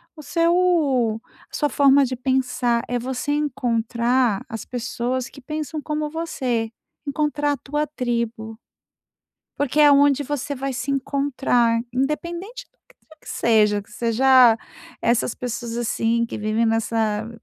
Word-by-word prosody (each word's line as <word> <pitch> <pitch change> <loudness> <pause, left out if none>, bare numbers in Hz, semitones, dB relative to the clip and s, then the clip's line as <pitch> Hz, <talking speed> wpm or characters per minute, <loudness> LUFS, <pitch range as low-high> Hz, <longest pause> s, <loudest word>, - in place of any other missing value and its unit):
o 310 - -10
seu 320 -8 +2 0.3
a - - -7
sua 295 - +1
forma 280 -1 +5
de 255 0 -3
pensar. 250 -2 0
É 245 - -1
você 255 +3 -3
encontrar 240 -4 0
as 225 -1 -6
pessoas 250 +1 -3
que 275 - -14
pensam 305 +2 -5
como 300 0 -3
você, 255 -8 -2 0.3
encontrar 295 0 0
a - - -4
tua 295 +3 -2
tribo, 235 -5 -3 1.0
porque 285 +1 0
é 300 - +8
aonde 285 0 +5
você 285 0 -3
vai 270 0 -3
se 250 +3 -3
encontrar, 270 -4 +1
independente 340 - -3
do - - -44
que - - -24
quer 315 - -17
que - - -15
seja, 210 -3 +2
que 205 - -23
seja 240 +1 +5 0.5
essas 235 0 +1
pessoas, 240 -1 -5
assim, 235 0 0
que 230 - -6
vivem 215 +2 0
nessa 225 -1 0
255 Hz, 140 wpm, -22 LUFS, 235-290 Hz, 1.0 s, é